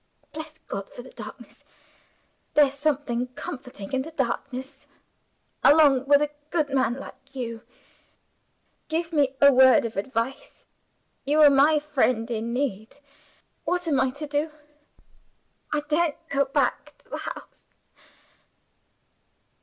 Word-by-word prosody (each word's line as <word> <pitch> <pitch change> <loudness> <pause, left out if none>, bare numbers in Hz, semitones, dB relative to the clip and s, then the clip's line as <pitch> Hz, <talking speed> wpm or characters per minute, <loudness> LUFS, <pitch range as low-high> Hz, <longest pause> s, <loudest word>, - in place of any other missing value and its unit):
"Bless 315 0 -7
God 195 0 -5
for 245 - -10
the 260 - -13
darkness; - - -11 0.9
there's 285 -2 +5
something 280 -4 -1
comforting 250 -7 -8
in 265 - +1
the 300 - -7
darkness 265 -2 -4 0.8
along 280 -3 +5
with 285 +1 +5
a 295 - -2 0.2
good 310 -4 0
man 260 -3 +1
like 270 0 -12
you. 230 -3 -5 1.3
Give 330 +1 -2
me 280 -3 +2
a 280 0 +7
word 260 -1 +6
of 225 -3 -5
advice. 230 +5 -4 0.6
You 295 +3 +1
are 295 -1 +8
my 285 +3 +5
friend 255 -6 0
in 230 +1 -2
need. 235 -3 -3 0.7
What 355 -1 -1
am 280 -5 +2
I 265 - +2
to 285 +4 -7
do? 295 +2 -1 1.2
I 300 - 0
daren't 305 +1 -1
go 280 0 +2
back 270 - -1
to - - -29
the - - -3
house!" - - -9
275 Hz, 130 wpm, -25 LUFS, 250-295 Hz, 1.3 s, are